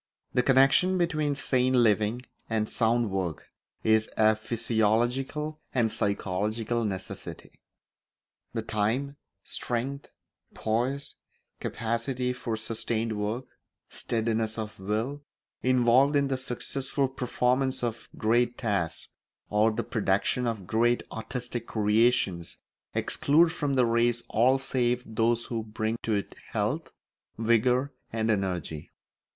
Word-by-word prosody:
The 125 - +4
connection 135 +9 +4
between 155 -5 +1
sane 130 -2 +2
living 115 0 +3 0.3
and 110 -1 0
sound 115 -1 +1
work 90 -5 -3 0.3
is 110 0 +3
a 110 0 +5
physiological 120 +7 0 0.2
and 115 -3 +2
psychological 105 +4 -1
necessity. 95 -3 -6 0.9
The - - -3
time, 125 +7 -1 0.3
strength, 130 +4 -3 0.5
poise, 125 +6 -1 0.4
capacity 120 +3 -2
for 125 -3 -3
sustained 115 0 -2
work, 105 +5 -2 0.4
steadiness 110 -1 -1
of 110 -2 -5
will, 110 +9 -2 0.4
involved 130 +3 +4
in 140 -1 +2
the 135 - +1
successful 135 +2 -2
performance 130 0 0
of 115 -1 -3
great 120 +2 +2
tasks 100 -8 -1 0.4
or 105 +2 +4
the 110 - -2
production 110 +4 0
of 110 -5 -3
great 120 +4 +2
artistic 120 +1 -4
creations 105 -4 +1 0.4
exclude 165 +4 +3
from 145 -4 -1
the 125 -2 +4
race 120 0 +2
all 125 +5 +4
save 125 -2 0
those 115 +1 +1
who 115 -2 -3
bring 110 +1 -2
to 110 - 0
it 100 - -3 0.2
health, - - -1 0.5
vigour, 125 +4 +2 0.2
and 115 0 +1
energy. 90 -7 -2
115 Hz, 110 wpm, -28 LUFS, 110-130 Hz, 0.9 s, a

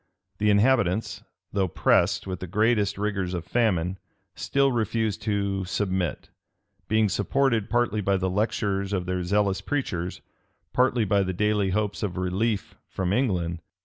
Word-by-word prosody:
The 105 0 +2
inhabitants, 105 -2 +2 0.3
though 100 -2 +1
pressed 90 +2 +2
with 95 -2 -4
the 95 - -6
greatest 105 +1 +1
rigors 100 -3 -2
of 85 - -4
famine, 95 -6 0 0.3
still 140 0 +1
refused 110 -2 -1
to 100 -2 -1
submit; 95 -4 -2 0.6
being 110 0 +3
supported, 115 +2 +1
partly 120 -3 +1
by 100 0 +1
the 95 0 -1
lectures 100 0 -1
of 90 -2 -1
their 90 0 -1
zealous 100 +1 +1
preachers, 90 -11 -3 0.5
partly 125 -3 +2
by 100 0 +2
the 95 -1 -1
daily 105 +1 +1
hopes 105 +1 -1
of 95 -4 -3
relief 95 +4 -1
from 95 0 -2
England. 90 -9 0
100 Hz, 145 wpm, -26 LUFS, 95-110 Hz, 0.6 s, being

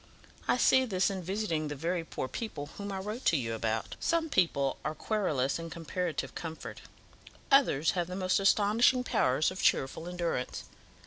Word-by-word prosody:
I - - +3
see 260 +1 +5
this 190 -3 +1
in 190 -1 -4
visiting 175 -4 -2
the 145 - -4
very 170 +4 -1
poor 130 - -4
people 145 - -6
whom 200 0 -4
I 195 - -3
wrote 210 +6 -5
to 165 - +4
you 115 -4 -2
about. 110 0 -2
Some 330 -1 +1
people 140 -7 +2
are 155 - -2
querulous 155 - 0
in 165 0 -6
comparative 170 -1 -3
comfort; 160 -1 -7 0.7
others 165 - +4
have 175 -2 -1
the 180 - -5
most 185 0 +1
astonishing 215 +5 +4
powers 145 - +2
of 185 - -6
cheerful 145 +5 +1
endurance. 170 -7 -2
175 Hz, 170 wpm, -30 LUFS, 150-200 Hz, 0.7 s, see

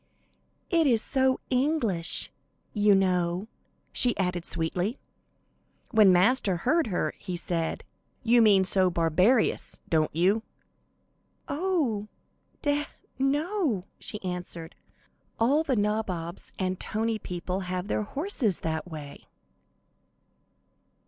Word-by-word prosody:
"It 330 -3 +3
is 235 -4 +4
so 265 +2 +1
English, 250 - 0 0.4
you 210 -1 +4
know," 180 0 +1 0.4
she 245 -1 +3
added, 180 -2 -1
sweetly. 175 +8 -1 0.9
When 215 -5 +6
Master 190 +1 +3
heard 305 - +1
her, 185 - -1
he 180 -3 -4
said: 170 -1 -2 0.4
"You 235 +1 +5
mean 200 -4 +5
so 185 0 +5
barbarous, 180 +8 +2
don't 155 -2 +2
you?" 190 +7 +2 1.1
"Oh, 285 - -1 0.6
deah, 290 0 0 0.3
no," 290 - 0
she 210 - -4
answered, 175 -2 -5 0.7
"all 270 +7 +3
the 275 -5 0
nabobs 205 -5 -2
and 190 - -1
and 185 - -4
tony 225 0 -2
people 180 0 -4
have 185 0 -4
their 215 - 0
horses 260 - -1
that 160 +2 -3
way." 150 -3 -9
205 Hz, 110 wpm, -27 LUFS, 180-255 Hz, 1.1 s, When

